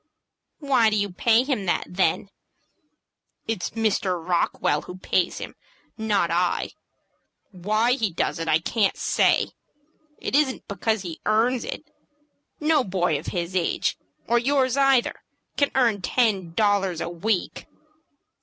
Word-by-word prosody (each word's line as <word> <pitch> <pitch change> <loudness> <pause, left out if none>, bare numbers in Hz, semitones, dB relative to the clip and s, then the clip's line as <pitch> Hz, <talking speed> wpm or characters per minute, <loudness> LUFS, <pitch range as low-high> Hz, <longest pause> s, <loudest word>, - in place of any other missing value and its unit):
"Why 270 -7 +3
do 215 - -1
you 200 -1 -1
pay 230 +6 +3
him 255 -9 -2
that, - - +1
then?" 185 +1 0 1.2
"It's 220 -5 -2
Mr. 210 -5 0
Rockwell 165 -3 0
who 180 - -9
pays 185 -1 0
him, - - -7 0.4
not 205 -6 0
I. 175 +1 0 0.8
Why 215 +6 +1
he 230 -5 +1
does 165 - -2
it, 165 - -4
I 155 -1 +4
can't 195 +5 0
say. - - +2 0.7
It - - -5
isn't 285 -3 +1
because 205 +1 -1
he 170 -3 -7
earns 230 +4 +2
it. - - -6 0.8
No 305 -2 +3
boy 175 -7 0
of - - -11
his 175 +1 -3
age, 175 -2 0 0.3
or 240 0 +3
yours 260 0 +1
either, 270 -3 +3 0.4
can 285 - +2
earn 230 -6 +2
ten 195 -4 0
dollars 200 -5 +1
a 170 - -3
week." 180 +3 -2
205 Hz, 135 wpm, -24 LUFS, 180-240 Hz, 1.2 s, I